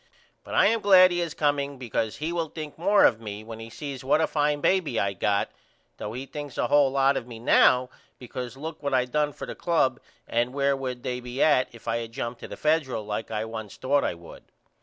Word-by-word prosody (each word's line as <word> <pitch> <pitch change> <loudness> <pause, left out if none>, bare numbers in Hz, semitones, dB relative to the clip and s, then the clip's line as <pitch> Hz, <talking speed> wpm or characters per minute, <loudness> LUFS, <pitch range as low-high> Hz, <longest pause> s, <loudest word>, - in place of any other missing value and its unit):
But - - -6
I - - +5
am 225 +2 +3
glad 185 -2 +7
he 175 0 0
is 165 -2 -3
comeing 145 -2 0
because 115 -3 -2
he 160 +3 -3
will 165 -2 -2
think 155 -2 -7
more 200 +5 +4
of 115 -2 +3
me 105 -1 -7
when 110 0 -9
he 115 0 -8
sees 140 +1 -7
what 140 +4 +3
a 160 - +3
fine 150 -1 0
baby 160 -7 +1
I 100 0 0
got 100 +1 0 0.5
though 105 - -5
he 130 +3 -5
thinks 145 0 -8
a - - +1
hole 145 -1 +4
lot 135 0 +2
of 115 - -5
me 120 -2 -9
now 125 +2 +4 0.3
because 125 0 -7
look 160 +3 -7
what 140 -2 0
I 125 -1 +3
done 150 +3 0
for - - -8
the - - -6
club 160 -7 +1 0.3
and 120 +2 0
where 140 0 +2
would 130 -2 -5
they 125 0 -2
be 125 +2 -2
at 145 -5 +4
if 115 - -15
I 115 - +1
had 115 -1 -6
jumped 120 0 -4
to - - -8
the - - -8
Federal 150 -8 0
like 105 +1 -4
I 110 0 -2
once 110 -2 -7
thought 140 +2 +1
I - - -1
would. 85 0 -13
130 Hz, 240 wpm, -26 LUFS, 115-150 Hz, 0.5 s, glad